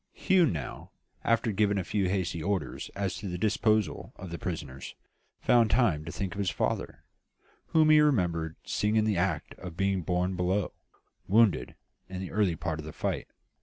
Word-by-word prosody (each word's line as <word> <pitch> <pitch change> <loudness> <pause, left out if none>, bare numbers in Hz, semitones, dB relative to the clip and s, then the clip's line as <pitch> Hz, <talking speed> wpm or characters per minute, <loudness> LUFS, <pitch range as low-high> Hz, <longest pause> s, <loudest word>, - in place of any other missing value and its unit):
"Hugh 185 -3 +3
now, 75 - -5 0.3
after 115 -1 +2
giving 100 0 +2
a 95 - 0
few 95 0 0
hasty 90 -3 -1
orders 100 +2 -2
as 100 -2 -2
to 105 - -6
the 90 -1 -3
disposal 110 +1 +1
of 95 -3 -9
the 85 - -5
prisoners, 75 -7 -5 0.5
found 115 -2 +4
time 105 -10 +2
to 85 - -5
think 95 -2 -3
of 100 - -7
his 100 -2 +1
father, - - -2 0.6
whom 155 -1 +4
he 155 0 +7
remembered 85 - +1
seeing 105 +1 0
in 110 -1 +3
the 105 -3 +1
act 85 -3 -1
of 90 -2 -8
being 95 -1 +1
borne 90 +2 0
below, 90 +2 0 0.6
wounded, 100 - +3 0.3
in 95 -1 -5
the 95 - -5
early 100 -5 +2
part 80 0 -3
of 75 - -6
the 80 - -6
fight. - - -2
95 Hz, 180 wpm, -29 LUFS, 85-105 Hz, 0.6 s, he